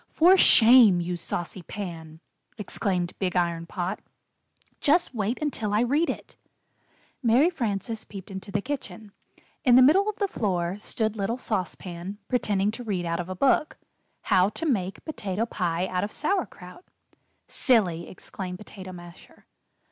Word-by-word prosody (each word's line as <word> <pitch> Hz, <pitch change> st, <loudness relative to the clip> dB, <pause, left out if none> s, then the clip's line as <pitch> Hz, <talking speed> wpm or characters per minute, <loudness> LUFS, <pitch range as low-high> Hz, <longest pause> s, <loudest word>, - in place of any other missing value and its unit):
"For 355 Hz, +4 st, +5 dB
shame, 230 Hz, -, +7 dB
you 175 Hz, +1 st, -2 dB
saucy 175 Hz, +2 st, -5 dB
Pan!" 165 Hz, -4 st, -8 dB, 0.4 s
exclaimed 185 Hz, -3 st, -2 dB
Big 185 Hz, -2 st, -1 dB
Iron 170 Hz, -2 st, 0 dB
Pot. 180 Hz, +3 st, -3 dB, 0.8 s
"Just 325 Hz, +1 st, +2 dB
wait 220 Hz, +1 st, -1 dB
until 225 Hz, -9 st, -2 dB
I 215 Hz, -, +3 dB
read 285 Hz, +7 st, +1 dB
it!" -, -, -6 dB, 0.9 s
Mary 255 Hz, +8 st, +4 dB
Frances 225 Hz, -, -3 dB
peeped 195 Hz, 0 st, -10 dB
into 190 Hz, +1 st, -7 dB
the 205 Hz, 0 st, -1 dB
kitchen. 220 Hz, -7 st, -6 dB, 0.5 s
In 245 Hz, -2 st, +5 dB
the 255 Hz, -, +8 dB
middle 385 Hz, +10 st, +5 dB
of 425 Hz, -, -4 dB
the 410 Hz, -1 st, -1 dB
floor 185 Hz, -, -2 dB
stood 220 Hz, 0 st, -2 dB
little 220 Hz, +3 st, -2 dB
Sauce 205 Hz, -8 st, -2 dB
Pan, 180 Hz, +2 st, -8 dB
pretending 210 Hz, -5 st, +1 dB
to 235 Hz, +3 st, -7 dB
read 190 Hz, -6 st, -2 dB
out 170 Hz, 0 st, -2 dB
of 175 Hz, +1 st, -5 dB
a 185 Hz, -, -4 dB
book: 275 Hz, -, +2 dB, 0.4 s
"'How 190 Hz, -2 st, +3 dB
to 325 Hz, -, -5 dB
Make 195 Hz, -, -2 dB
Potato 225 Hz, -, -3 dB
Pie 175 Hz, -5 st, -1 dB
Out 185 Hz, -1 st, -2 dB
of 205 Hz, -, -3 dB
Sauer 370 Hz, +4 st, -1 dB
kraut.'" 180 Hz, -, -14 dB, 0.6 s
"Silly!" 180 Hz, -, +1 dB
exclaimed 180 Hz, -1 st, -7 dB
Potato 190 Hz, -2 st, -10 dB
Masher. 175 Hz, -1 st, -14 dB
205 Hz, 155 wpm, -26 LUFS, 180-245 Hz, 0.9 s, the